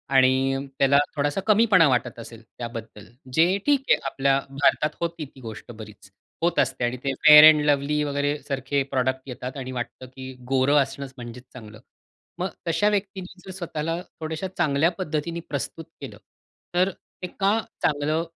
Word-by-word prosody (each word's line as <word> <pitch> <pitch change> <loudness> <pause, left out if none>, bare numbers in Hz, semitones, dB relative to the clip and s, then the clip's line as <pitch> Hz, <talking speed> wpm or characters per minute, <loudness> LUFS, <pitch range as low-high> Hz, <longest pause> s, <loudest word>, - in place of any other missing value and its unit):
आणि 130 +1 +3 0.2
त्याला 140 +1 +4 0.2
थोडासा 145 +5 -1
कमीपणा 210 -6 +5
वाटत 120 -2 -1
असेल 115 0 -11
त्याबद्दल, 115 -3 -9 0.3
जे 175 +5 +3
ठीक 285 -2 +2
आहे. - - +6
आपल्या 135 0 +1
भारतात 145 +2 +1
होती 170 -2 -3
ती 135 -1 -17
गोष्ट 115 0 -9
बरीच, 105 -3 -12 0.3
होत 170 +1 +1
असते - - 0
आणि 120 +1 -2
ते 135 - 0 0.2
Fair 150 0 +11
and 150 -1 -1
Lovely 145 +1 +1
वगैरे, 145 +1 -1
सारखे 135 0 -1
प्रॉडक्ट 130 0 0
येतात 125 +2 -6
आणि 130 -1 -6
वाटतं 125 +1 -6
की 130 0 -8 0.2
गोरं 135 +2 +3
असणंच, 135 0 -8
म्हणजेच 120 0 -9
चांगलं. 110 -4 -11 0.6
मग 185 +1 -1 0.2
तशा 165 +6 +2
व्यक्तींनी 195 -2 -4
जर 190 - -8
स्वतःला 165 -1 -3 0.2
थोड्याश्या 160 +4 -4
चांगल्या 155 0 +2
पद्धतीने 165 -1 -3
प्रस्तुत 140 +3 -5 0.2
केलं, - - -8 0.6
तर 185 +2 +3
ते 180 0 -11
का 205 +3 +3 0.2
चांगलं 150 +2 +1
145 Hz, 155 wpm, -24 LUFS, 130-165 Hz, 0.6 s, Fair